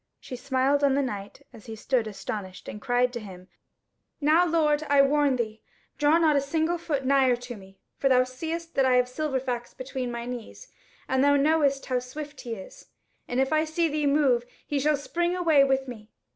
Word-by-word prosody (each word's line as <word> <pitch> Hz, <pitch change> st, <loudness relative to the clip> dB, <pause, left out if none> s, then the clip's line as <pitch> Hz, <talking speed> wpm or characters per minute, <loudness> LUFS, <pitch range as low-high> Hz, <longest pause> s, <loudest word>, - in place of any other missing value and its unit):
She 255 Hz, -, -8 dB
smiled 270 Hz, +2 st, +1 dB
on 275 Hz, -1 st, +4 dB
the 280 Hz, -, +1 dB
knight 205 Hz, -5 st, -6 dB
as 220 Hz, -, -14 dB
he 225 Hz, -, -6 dB
stood 230 Hz, +1 st, 0 dB
astonished, 200 Hz, -2 st, -7 dB
and 210 Hz, -, -7 dB
cried 245 Hz, 0 st, +1 dB
to 240 Hz, -, -4 dB
him; 185 Hz, -4 st, -11 dB, 0.7 s
"Now, 320 Hz, +4 st, +4 dB
lord, 310 Hz, -3 st, +2 dB
I 285 Hz, -1 st, +6 dB
warn 285 Hz, -1 st, +2 dB
thee, 220 Hz, -3 st, -4 dB, 0.4 s
draw 295 Hz, +2 st, +4 dB
not 315 Hz, -3 st, +3 dB
a 280 Hz, -, +3 dB
single 320 Hz, +4 st, -1 dB
foot 290 Hz, -5 st, -2 dB
nigher 265 Hz, -2 st, +4 dB
to 245 Hz, 0 st, -8 dB
me; 195 Hz, -1 st, -15 dB, 0.2 s
for 270 Hz, -, +2 dB
thou 255 Hz, -1 st, +5 dB
seest 325 Hz, +6 st, -6 dB
that 270 Hz, -, +2 dB
I 255 Hz, -1 st, +4 dB
have 250 Hz, 0 st, +4 dB
Silverfax 255 Hz, -3 st, -3 dB
between 255 Hz, -1 st, -4 dB
my 235 Hz, 0 st, -5 dB
knees, 245 Hz, -, -8 dB, 0.4 s
and 260 Hz, 0 st, +1 dB
thou 285 Hz, 0 st, +5 dB
knowest 285 Hz, -1 st, +2 dB
how 255 Hz, -1 st, 0 dB
swift 290 Hz, +4 st, -8 dB
he 235 Hz, -3 st, -5 dB
is, 190 Hz, -3 st, -12 dB, 0.4 s
and 245 Hz, -, -2 dB
if 270 Hz, +3 st, +1 dB
I 310 Hz, 0 st, +3 dB
see 320 Hz, +1 st, 0 dB
thee 300 Hz, -1 st, 0 dB
move, 280 Hz, -4 st, +3 dB, 0.2 s
he 290 Hz, -, -1 dB
shall 300 Hz, +1 st, +2 dB
spring 345 Hz, +5 st, -1 dB
away 325 Hz, -6 st, +4 dB
with 270 Hz, -1 st, +1 dB
me. 220 Hz, -3 st, -10 dB
270 Hz, 200 wpm, -26 LUFS, 245-300 Hz, 0.7 s, I